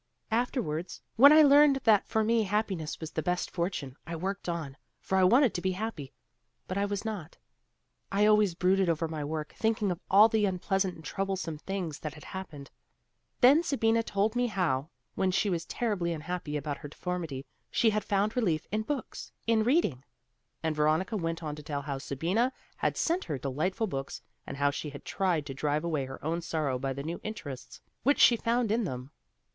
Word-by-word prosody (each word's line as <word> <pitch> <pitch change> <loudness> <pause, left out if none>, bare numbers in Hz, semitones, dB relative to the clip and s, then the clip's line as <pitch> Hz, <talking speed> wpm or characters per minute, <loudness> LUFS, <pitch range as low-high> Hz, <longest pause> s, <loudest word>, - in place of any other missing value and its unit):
Afterwards 220 - -1 0.2
when 275 +5 +9
I 310 0 +8
learned 290 0 +7
that 215 -3 +4
for 220 - +1
me 230 +1 +3
happiness 195 -6 -2
was 160 -1 -6
the 160 - -2
best 180 +1 -1
fortune, 170 -7 -3
I 170 - -4
worked 190 +3 -3
on, 160 -5 -4 0.2
for 190 - -2
I 190 - +4
wanted 245 +6 +5
to 175 - -3
be 185 0 0
happy, 185 -9 -5 0.6
but 185 - -3
I 200 +1 +1
was 205 +1 -3
not. 195 -7 -5 0.7
I 200 +1 +3
always 210 -4 +4
brooded 185 +1 +2
over 165 0 0
my 155 -2 -4
work, 155 +1 -4
thinking 220 -3 +1
of 175 - -4
all 205 +3 +8
the 220 -2 +2
unpleasant 190 0 0
and 160 - -13
troublesome 190 -5 -3
things 180 -5 -4
that 150 -3 -6
had 150 - -12
happened. 155 -8 -8 0.7
Then 275 +6 +7
Sabina 230 -8 +2
told 210 +1 0
me 245 0 +2
how, 165 - 0 0.2
when 190 - +1
she 195 +2 +1
was 165 -2 -2
terribly 200 -8 -1
unhappy 160 -1 -4
about 145 -1 -4
her - - -7
deformity, 160 -5 -4 0.2
she 225 - +3
had 215 0 -1
found 205 +2 0
relief 170 -11 +1
in 215 +1 0
books, 275 +5 -5
in 225 -1 +3
reading," 230 - +1 0.6
and 160 -1 0
Veronica 155 +8 +1
went 165 -3 -2
on 150 -1 -3
to - - -8
tell 145 -2 -4
how 140 -1 -4
Sabina 180 - 0 0.3
had - - 0
sent 345 +3 0
her 145 - -3
delightful 155 - -1
books 135 -8 -5 0.3
and 140 - -6
how 145 0 +2
she 150 +1 -5
had 140 0 -10
tried 180 -6 0
to 135 - -6
drive 150 +2 -1
away 155 -5 -1
her 135 +2 -9
own 165 +2 -1
sorrow 150 -6 -1
by 135 +1 -2
the 140 +1 -5
new 165 +3 -5
interests 145 - -7 0.2
which 285 +3 +2
she 240 - +7
found 230 -1 0
in 230 +2 +2
them. 130 -6 -5
180 Hz, 195 wpm, -29 LUFS, 150-215 Hz, 0.7 s, when